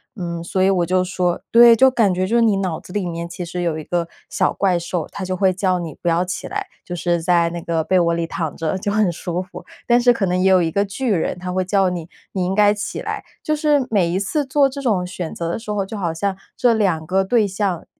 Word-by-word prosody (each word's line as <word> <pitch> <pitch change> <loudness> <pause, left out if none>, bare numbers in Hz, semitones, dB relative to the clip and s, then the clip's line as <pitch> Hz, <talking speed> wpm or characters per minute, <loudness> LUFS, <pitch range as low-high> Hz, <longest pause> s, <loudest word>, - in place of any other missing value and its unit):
嗯， 170 -4 -4
所 185 +2 -1
以 190 - +4
我 180 -3 +2
就 185 +1 +1
说 180 -1 -1
对， 235 0 +8
就 265 +4 +6
感 225 -7 +2
觉 185 +1 -1
就 225 - 0
是 235 - +4
你 220 -4 +3
脑 185 -4 -2
子 - - -14
里 200 -3 -1
面 170 0 -4
其 170 +1 -6
实 180 +1 -4
有 165 -2 -1
一 - - -7
个 170 +1 -2 0.2
小 - - +1
怪 185 -2 +1
兽， 170 0 -3
它 200 - -6
就 185 0 -2
会 190 0 +3
叫 185 -1 0
你 165 -4 -6
不 175 - 0
要 170 +1 +2
起 180 0 -5
来， 405 0 -4 0.2
就 175 - -5
是 175 0 0
在 170 -1 +3
那 170 - -4
个 165 -1 -1
被 185 +3 +2
窝 170 -1 +2
里 170 0 -1
躺 160 -2 -4
着 165 +3 -2
就 205 +2 -2
很 210 -2 +2
舒 175 +1 -3
服。 185 +2 -10 0.2
但 240 0 +5
是 245 0 +5
可 210 - -1
能 180 0 0
也 190 +1 +3
有 185 -1 +5
一 165 - +1
个 200 +4 +1
巨 235 +6 -3
人， 180 -1 -1
它 180 0 -4
会 185 0 +1
叫 195 0 +2
你， 175 -3 -5 0.3
你 185 -2 -1
应 185 - -1
该 205 0 +5
起 205 - -5
来。 - - -4 0.2
就 305 - 0
是 295 -4 +2
每 195 -6 +2
一 180 +2 0
次 285 +9 -1
做 275 +1 +3
这 275 +1 -7
种 200 -9 0
选 180 -2 -5
择 170 - -4
的 - - -2
时 220 -1 -6
候， 205 -2 -1
就 210 +3 -7
好 170 -5 -2
像 190 +4 -2 0.2
这 245 -2 +4
两 185 -8 0
个 190 +2 +2
对 215 +2 +2
象， 195 -3 -2
185 Hz, 295 characters per minute, -20 LUFS, 175-205 Hz, 0.3 s, 对